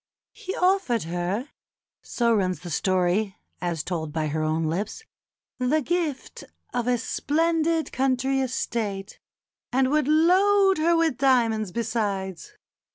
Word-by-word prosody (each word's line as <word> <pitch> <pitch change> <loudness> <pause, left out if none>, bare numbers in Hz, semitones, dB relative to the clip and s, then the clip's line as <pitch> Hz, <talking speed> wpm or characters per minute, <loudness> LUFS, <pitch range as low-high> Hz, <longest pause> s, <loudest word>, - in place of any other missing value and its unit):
"He 375 - -6
offered 360 - +2
her" 175 - -3 0.5
(so 235 -2 0
runs 185 -6 0
the 175 -1 -7
story 185 +3 +1 0.2
as 170 -4 -2
told 160 -4 -3
by 155 -1 -1
her 155 +2 -2
own 155 +1 0
lips) 190 - -3 0.6
"the 280 +5 +1
gift 325 -3 -3 0.3
of 245 -1 -1
a 250 -1 +3
splendid 325 +5 0
country 265 0 +1
estate, 210 -6 -3 0.5
and 260 +1 +2
would 300 -2 +2
load 380 +4 +4
her 335 +2 +3
with 320 -6 +1
diamonds 230 -7 +2
besides. 200 -5 -3
240 Hz, 125 wpm, -25 LUFS, 185-310 Hz, 0.6 s, load